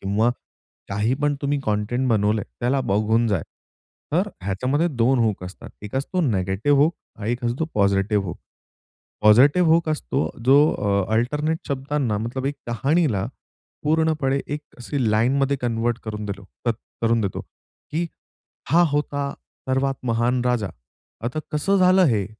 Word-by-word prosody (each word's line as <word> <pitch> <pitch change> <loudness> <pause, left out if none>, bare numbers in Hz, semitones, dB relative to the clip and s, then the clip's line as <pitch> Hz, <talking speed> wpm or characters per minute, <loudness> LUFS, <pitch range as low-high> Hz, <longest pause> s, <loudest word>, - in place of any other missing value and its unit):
किंवा 105 +5 +2 0.6
काही 105 +6 0
पण 145 0 +2
तुम्ही 140 0 +1
कंटेंट 110 +5 0
बनवलंय, 105 -1 +2 0.2
त्याला 130 +3 +1
बघून 110 +2 +2
जाय. 95 -7 0 0.7
तर 185 +6 +2
ह्याच्यामध्ये 125 - 0
2 130 -2 +2
हुक 110 -5 +1
असतात. 90 +2 -10
एक 105 +2 -8
असतो 180 +7 -1
निगेटिव्ह 105 - +1
हुक 160 +3 +2 0.2
आणि 110 +2 -3
एक 120 +1 -4
असतो 120 +7 0
पॉझिटिव्ह 100 0 +2
हुक. 85 - -5 0.9
पॉझिटिव्ह 140 +11 +6
हुक 165 -1 +3
असतो, 145 -2 -1 0.2
जो 135 +3 +6 0.2
अ, 100 -2 +1
अल्टरनेट 150 +7 0
शब्दांना 135 -5 -1
मतलब, 125 +4 -3
एक 145 - -1
कहाणीला 135 - +1 0.6
पूर्णपणे 155 -3 +1
एक 145 +1 -3 0.2
अशी 120 -2 -1
लाईनमध्ये 135 +5 +2
कन्व्हर्ट 120 0 0
करून 105 -1 -5
दिल 100 -1 -5 0.3
तर - - +4 0.3
करून 115 0 +3
देतो, 100 -3 -2
की 165 +3 -7 0.6
"हा 170 +3 +6
होता 145 -1 -1 0.4
सर्वात 135 +1 +1
महान 120 +2 +1
राजा. 120 -5 +1 0.6
आता 125 +6 -2
कसं 185 +7 +2
झालं 185 0 +5
हे? 105 -7 +1
125 Hz, 140 wpm, -23 LUFS, 105-145 Hz, 0.9 s, पॉझिटिव्ह